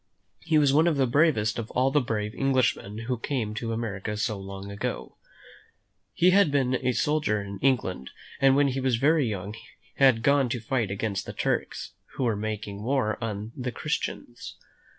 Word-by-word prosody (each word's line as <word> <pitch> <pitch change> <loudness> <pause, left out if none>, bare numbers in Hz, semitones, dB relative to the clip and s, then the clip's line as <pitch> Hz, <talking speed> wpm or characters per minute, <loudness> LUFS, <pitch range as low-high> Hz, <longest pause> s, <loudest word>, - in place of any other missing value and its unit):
He 160 -1 +1
was 145 -2 +4
one 155 +4 +4
of 160 -4 +2
the 135 - +3
bravest 120 -6 +2
of 115 - -5
all 130 +2 +1
the 145 +1 +3
brave 105 -3 -2
English 130 -2 +2
men 105 +2 -9
who 125 -2 -1
came 115 -5 -2
to 115 +2 -4
America 105 -2 -3
so 110 +1 -1
long 95 +1 -8
ago. 100 - -4 1.0
He 180 +2 +5
had 200 -3 +5
been 130 -2 +1
a 130 0 +2
soldier 150 -7 +1
in 100 0 -7
England, 105 - 0 0.3
and 135 -1 +5
when 140 0 +4
he 135 +1 -2
was 130 -2 +1
very 145 +3 +3
young 100 0 -4 0.4
had 130 -5 +4
gone 140 -2 +3
to 120 - -2
fight 115 -1 -1
against 100 0 -3
the - - -5
Turks, - - -2 0.2
who - - -2
were 115 -3 +1
making 105 -1 -4
war 120 -2 0
on 105 0 -4
the 125 -1 -3
Christians. 120 -4 -4
120 Hz, 185 wpm, -26 LUFS, 105-135 Hz, 1.0 s, He